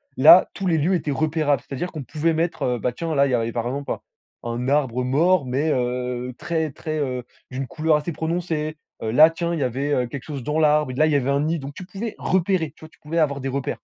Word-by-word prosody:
Là, 160 Hz, +7 st, +8 dB
tous 195 Hz, -, -5 dB
les 170 Hz, -3 st, +2 dB
lieux 165 Hz, +5 st, +2 dB
étaient 150 Hz, -4 st, 0 dB
repérables. 150 Hz, -1 st, +1 dB
C'est-à-dire 160 Hz, +7 st, -4 dB
qu'on 155 Hz, -3 st, -6 dB
pouvait 160 Hz, +4 st, 0 dB
mettre, 165 Hz, +2 st, -1 dB
heu, 125 Hz, -1 st, 0 dB
bah, 125 Hz, +1 st, -1 dB
tiens, 165 Hz, +2 st, -3 dB
là, 140 Hz, 0 st, +4 dB
il 130 Hz, -, -2 dB
y -, -, 0 dB
avait 115 Hz, -1 st, 0 dB
par 115 Hz, 0 st, -3 dB
exemple 140 Hz, +3 st, -4 dB
un -, -, -3 dB, 0.5 s
un 120 Hz, +2 st, -2 dB
arbre 130 Hz, -4 st, +1 dB
mort 150 Hz, +5 st, +3 dB
mais, 140 Hz, +5 st, 0 dB
heu, 125 Hz, 0 st, -2 dB
très 160 Hz, -3 st, -2 dB
très, 155 Hz, +2 st, -4 dB
heu, 125 Hz, -3 st, -2 dB, 0.3 s
d'une 130 Hz, +1 st, -4 dB
couleur 155 Hz, +1 st, +2 dB
assez 155 Hz, +3 st, -4 dB
prononcée. 160 Hz, -1 st, -2 dB, 0.2 s
Heu, 110 Hz, -, -2 dB
là 155 Hz, +6 st, +8 dB
tiens 170 Hz, +1 st, -2 dB
il 165 Hz, -, -2 dB
y -, -, +1 dB
avait 130 Hz, 0 st, 0 dB
quelque 140 Hz, -1 st, -6 dB
chose 145 Hz, -3 st, -6 dB
dans 150 Hz, +2 st, -1 dB
l'arbre. 150 Hz, -3 st, +3 dB
Là, 155 Hz, -, +4 dB
il 155 Hz, -, +2 dB
y -, -, +2 dB
avait 135 Hz, -1 st, +1 dB
un 140 Hz, -, +2 dB
nid 160 Hz, +2 st, 0 dB
donc 140 Hz, +1 st, -7 dB
tu 185 Hz, +2 st, -9 dB
pouvais 205 Hz, +4 st, -6 dB
repérer, 185 Hz, -3 st, +1 dB
tu 155 Hz, -, -12 dB
vois? -, -, -13 dB
Tu -, -, -26 dB
pouvais 165 Hz, +3 st, -2 dB
avoir 140 Hz, -3 st, +1 dB
des 135 Hz, -, -2 dB
repères. 135 Hz, 0 st, -3 dB
150 Hz, 255 wpm, -23 LUFS, 130-160 Hz, 0.5 s, Là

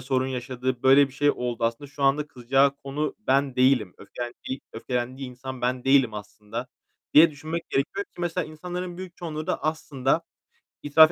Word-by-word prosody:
sorun 130 Hz, 0 st, 0 dB
yaşadı, 130 Hz, -1 st, -3 dB
böyle 135 Hz, +1 st, +7 dB
bir 130 Hz, -, -16 dB
şey 145 Hz, +1 st, +3 dB
oldu. 120 Hz, -3 st, -2 dB
"Aslında 115 Hz, +5 st, -2 dB
şu 145 Hz, -, -6 dB
anda 140 Hz, +2 st, +3 dB
kızacağı 135 Hz, +2 st, +2 dB
konu 140 Hz, +2 st, -3 dB
ben 140 Hz, -8 st, +1 dB
değilim, 125 Hz, -7 st, +3 dB
öfkelendiği 120 Hz, +5 st, -6 dB
öfkelendiği 125 Hz, +3 st, -3 dB
insan 130 Hz, +1 st, -7 dB
ben 125 Hz, +1 st, -1 dB
değilim 135 Hz, -4 st, +4 dB
aslında." 105 Hz, +3 st, -6 dB, 0.5 s
diye 160 Hz, +3 st, +9 dB
düşünmek 155 Hz, +3 st, -5 dB
gerekiyor, 160 Hz, -, 0 dB
ki 285 Hz, -, -14 dB
mesela 175 Hz, 0 st, -1 dB
insanların 175 Hz, +3 st, -5 dB
büyük 185 Hz, -1 st, -8 dB
çoğunluğu 155 Hz, -3 st, -5 dB
da -, -, -1 dB
aslında 145 Hz, -4 st, 0 dB, 0.6 s
itiraf 155 Hz, +2 st, +7 dB
135 Hz, 160 wpm, -26 LUFS, 125-155 Hz, 0.6 s, diye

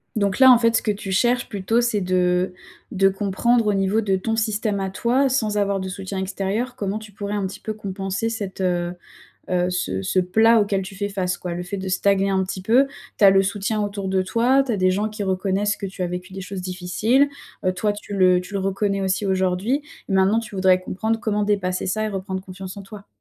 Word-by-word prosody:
Donc, 200 Hz, -3 st, 0 dB
là, 260 Hz, -1 st, +8 dB
en 245 Hz, -, +7 dB
fait, 230 Hz, -1 st, +3 dB
ce -, -, +1 dB
que 215 Hz, -, +1 dB
tu 200 Hz, -1 st, -5 dB
cherches 240 Hz, +6 st, +2 dB
plutôt, 210 Hz, +4 st, 0 dB
c'est 235 Hz, -4 st, 0 dB
de 180 Hz, 0 st, +1 dB, 0.4 s
de 195 Hz, 0 st, +3 dB
comprendre, 205 Hz, +4 st, +1 dB
au 210 Hz, -, +2 dB
niveau 195 Hz, +3 st, +1 dB
de 195 Hz, -3 st, +1 dB
ton 225 Hz, +4 st, -1 dB
système 215 Hz, -1 st, 0 dB
à 190 Hz, -1 st, -2 dB
toi, 245 Hz, +7 st, +2 dB
sans 225 Hz, -6 st, 0 dB
avoir 200 Hz, -1 st, +1 dB
de 190 Hz, 0 st, -4 dB
soutien 190 Hz, +1 st, -5 dB
extérieur, 200 Hz, +6 st, -2 dB
comment 205 Hz, -3 st, -3 dB
tu 215 Hz, -1 st, -12 dB
pourrais 200 Hz, +1 st, -5 dB
un 200 Hz, -2 st, -1 dB
petit 190 Hz, -, -9 dB
peu 215 Hz, -, -4 dB
compenser 195 Hz, 0 st, -3 dB
cette, 200 Hz, -4 st, -5 dB
heu 175 Hz, -1 st, 0 dB, 0.6 s
heu, 180 Hz, 0 st, +1 dB
ce 95 Hz, -, -2 dB
ce 140 Hz, -, 0 dB
plat 220 Hz, +6 st, +4 dB
auquel 200 Hz, -2 st, 0 dB
tu 195 Hz, +1 st, -9 dB
fais 205 Hz, +1 st, -2 dB
face, 180 Hz, -3 st, -2 dB
quoi? 175 Hz, -1 st, -5 dB
Le 175 Hz, -, -4 dB
fait 180 Hz, +3 st, -5 dB
de 190 Hz, 0 st, -5 dB
stagner 195 Hz, +1 st, +2 dB
un 190 Hz, -1 st, +2 dB
petit 185 Hz, 0 st, -4 dB
peu. 245 Hz, +8 st, +4 dB, 0.3 s
Tu -, -, +4 dB
as 195 Hz, -, +9 dB
le 195 Hz, 0 st, +4 dB
soutien 205 Hz, +2 st, -1 dB
autour 200 Hz, -1 st, -3 dB
de 190 Hz, 0 st, +1 dB
toi. 240 Hz, +8 st, +2 dB
Tu 245 Hz, -, -1 dB
as -, -, 0 dB
des 185 Hz, -1 st, +3 dB
gens 205 Hz, +3 st, 0 dB
qui 215 Hz, -1 st, -6 dB
reconnaissent 195 Hz, +2 st, 0 dB
que 200 Hz, -, -5 dB
tu 190 Hz, -1 st, -6 dB
as 180 Hz, -, -1 dB
vécu 180 Hz, +2 st, -6 dB
des 190 Hz, -, -6 dB
choses 190 Hz, 0 st, -6 dB
difficiles, 190 Hz, +9 st, +1 dB, 0.4 s
heu, 185 Hz, -, +2 dB
toi, 205 Hz, +3 st, 0 dB
tu 205 Hz, 0 st, -9 dB
le 185 Hz, -1 st, +4 dB
tu 180 Hz, +3 st, -11 dB
le -, -, +1 dB
reconnais 195 Hz, +1 st, -1 dB
aussi, 190 Hz, +2 st, 0 dB
aujourd'hui. 190 Hz, +8 st, 0 dB, 0.3 s
Maintenant, 195 Hz, +3 st, +3 dB
tu 210 Hz, -3 st, -9 dB
voudrais 185 Hz, -1 st, +4 dB
comprendre 220 Hz, +5 st, -2 dB
comment 210 Hz, -2 st, 0 dB
dépasser 190 Hz, -3 st, 0 dB
ça 215 Hz, +3 st, -1 dB
et -, -, -1 dB
reprendre 190 Hz, -2 st, -4 dB
confiance 185 Hz, 0 st, -8 dB
en 200 Hz, -, -7 dB
toi. 200 Hz, +1 st, -12 dB
195 Hz, 235 wpm, -22 LUFS, 185-215 Hz, 0.6 s, as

